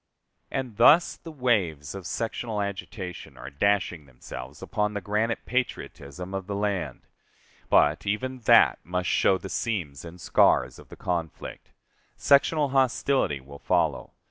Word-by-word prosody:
And 130 -6 -4
thus 150 +9 +6
the 165 - -10
waves 100 - 0
of 95 -2 -7
sectional 115 -1 -3
agitation 100 -2 -6
are 65 +3 -9
dashing 85 -1 0
themselves 65 -1 -10
against 105 0 -1
the - - -1
granite 105 +4 -1
patriotism 90 - -4
of 95 -1 -4
the 100 - -3
land. 100 -9 -2 0.7
But 75 +7 +3
even 130 +5 -2
that - - +6
must 90 +2 -2
show 95 - +3
the 95 - -8
seams 85 - -3
and 85 +1 -10
scars 60 -6 +3
of - - -15
the - - -10
conflict. 85 -3 -5 0.4
Sectional 145 +1 +3
hostility 130 - +1
will 70 +2 -13
follow. - - 0
100 Hz, 140 wpm, -26 LUFS, 80-115 Hz, 0.7 s, thus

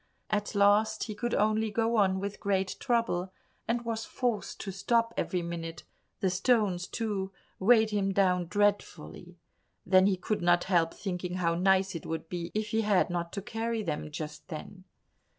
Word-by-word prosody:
At 210 0 -1
last 210 +2 +4
he 215 - -4
could 235 +3 -2
only 215 +1 +2
go 225 +2 0
on 190 -3 +3
with 200 +1 -5
great 195 -2 0
trouble, 230 -8 0 0.4
and 235 +1 -1
was 225 -1 -2
forced 240 -4 -2
to 195 - -4
stop 230 +4 +1
every 180 -2 -1
minute; 170 -1 -5 0.4
the 190 - +2
stones, 195 -2 +1
too, 205 -4 -3 0.3
weighed 220 +2 +5
him 200 -2 +1
down 180 -3 +2
dreadfully. 205 +2 -1 0.5
Then 185 0 +5
he 195 -2 +2
could 210 +4 -2
not 175 0 +3
help 170 -3 +1
thinking 180 -2 -4
how 170 -2 +1
nice 190 +2 +2
it 165 - -6
would 160 0 -4
be 175 -1 -4
if 215 0 -1
he 220 +1 +1
had 205 -4 +2
not 170 -1 -2
to 200 - -4
carry 225 +1 -2
them 155 -4 -3
just 150 0 -7
then. 185 +3 -8
195 Hz, 170 wpm, -29 LUFS, 180-215 Hz, 0.5 s, weighed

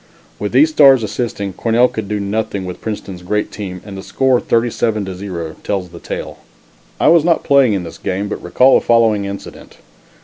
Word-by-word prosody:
With - - -3
these 315 +2 +4
stars 135 - +6
assisting, 105 -3 -3
Cornell 115 +6 +2
could 110 -4 -6
do 105 -1 -1
nothing 100 -1 -3
with 90 -1 -7
Princeton's 100 -4 -6
great 105 +4 -2
team 95 -4 -7
and 100 - -8
the 95 - -7
score 130 +4 +1
37 115 -2 0
to 95 - -5
0 90 -4 -6
tells 95 -3 -3
the - - -11
tale. - - -6 0.6
I - - +3
was 165 -1 +5
not 170 -1 +2
playing 140 -6 +4
in 95 -3 -2
this 85 - -10
game, 95 +2 -3
but 105 - -5
recall 130 +9 +4
the - - -13
following 110 -3 +3
incident. 100 0 -9
105 Hz, 195 wpm, -17 LUFS, 95-120 Hz, 0.6 s, stars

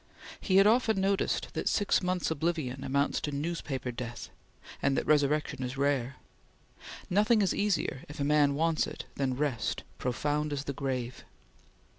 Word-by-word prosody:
He 190 - 0
had 195 +1 +7
often 220 -2 +3
noticed 195 0 0
that - - 0
six 205 - +2
months' 180 -2 -1
oblivion 155 -4 -2
amounts 140 +1 0
to 150 - -2
newspaper 140 -4 -3
death, 120 -1 -7 0.5
and 135 - +2
that - - 0
resurrection 150 -1 +2
is 130 +1 -4
rare. 140 -2 0 0.9
Nothing 210 +3 +3
is 190 - +1
easier, 200 -10 0
if 150 - -9
a - - 0
man 145 -1 +3
wants 165 +1 +1
it, - - -7
than 130 -2 -1
rest, 135 -7 -1 0.2
profound 145 +4 -1
as 140 -1 -3
the 140 - -4
grave. 130 -3 -3
145 Hz, 155 wpm, -30 LUFS, 135-170 Hz, 0.9 s, had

